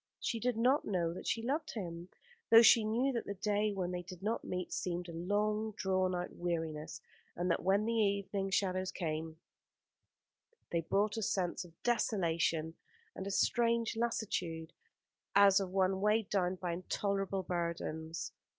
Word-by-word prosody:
She 230 - -2
did 245 0 0
not 255 +5 +3
know 170 -4 -1
that - - -7
she 225 - 0
loved 300 +5 -2
him, 175 -4 -5 0.4
though 230 +1 +9
she 230 0 +7
knew 240 +6 +1
that 235 - -3
the 200 - -3
day 210 +1 0
when 185 -3 -2
they 180 0 -3
did 180 +1 -11
not 220 +3 -1
meet 180 -1 -4
seemed 175 0 -2
a 170 - -7
long 210 +5 0
drawn 185 -2 0
out 180 0 -4
weariness, 160 -3 -3 0.3
and 175 +1 0
that - - +1
when 195 +4 +2
the 230 - 0
evening 200 -2 0
shadows 185 -1 0
came, 160 -2 -4 1.3
they 170 - +1
brought 205 +6 0
a - - -1
sense 190 -4 -1
of 170 -2 -18
desolation 170 -8 +1 0.4
and 195 - -5
a - - -2
strange 230 +3 +2
lassitude, 185 -8 -2 0.6
as 200 0 +7
of 195 -2 -3
one 190 0 +1
weighed 210 0 +2
down 185 -2 +1
by 180 -1 -3
intolerable 195 +2 -1
burdens. 170 -1 -3
190 Hz, 160 wpm, -34 LUFS, 175-215 Hz, 1.3 s, though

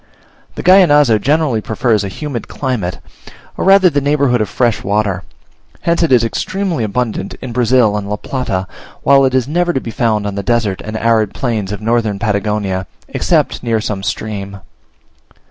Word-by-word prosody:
The - - -6
Gallinazo 150 - +5
generally 140 -2 +1
prefers 110 -1 0
a - - -3
humid 125 +3 -5
climate, 120 -10 -3 0.6
or - - -3
rather 195 -1 +6
the 145 -5 +1
neighbourhood 140 -4 +2
of 105 - -1
fresh 120 -3 0
water; 100 -2 0 0.6
hence 170 0 +1
it 165 - +2
is 120 -3 +5
extremely 185 - -2
abundant 110 +2 -2
in 130 - -8
Brazil 120 -2 +3
and 100 -1 -4
La 105 - -1
Plata, 105 -6 -3 0.4
while 135 0 +5
it 130 0 +1
is 130 -1 +1
never 175 +3 0 0.2
found 110 -2 0
on 100 - -2
the 100 - -3
desert 105 -2 0
and 110 0 -5
arid 110 -3 +1
plains 110 -6 -2
of 105 - -5
Northern 110 -2 0
Patagonia, 100 -3 -1 0.2
excepting - - 0
near 115 -2 0
some 105 -2 -3
stream. 100 -1 -5
115 Hz, 160 wpm, -15 LUFS, 105-135 Hz, 0.6 s, rather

